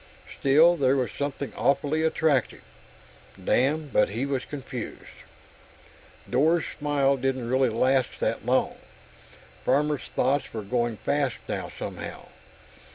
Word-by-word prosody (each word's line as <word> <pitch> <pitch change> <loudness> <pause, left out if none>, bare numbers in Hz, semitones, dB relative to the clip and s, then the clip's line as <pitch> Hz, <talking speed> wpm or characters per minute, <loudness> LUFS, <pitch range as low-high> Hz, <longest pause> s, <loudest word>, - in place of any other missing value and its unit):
Still, 160 +6 +5
there 135 -2 +3
was 130 -3 -1
something 140 -1 -4
awfully 145 +3 +1
attractive.... 160 -5 +1 0.8
Damn, 140 +10 +1
but 105 - +3
he 115 +6 -2
was 135 -2 -2
confused! 130 -5 -7 1.1
Dor's 160 +5 +2
smile 140 -2 +1
didn't 130 -2 -1
really 130 +1 +2
last 130 +3 +1
that - - -1
long; - - +1 0.9
Farmer's 145 +2 +1
thoughts 135 -1 -1
were 110 - -3
going 120 +1 -1
fast 140 -1 0
now, - - -4
somehow. - - -7
135 Hz, 115 wpm, -26 LUFS, 125-145 Hz, 1.1 s, Still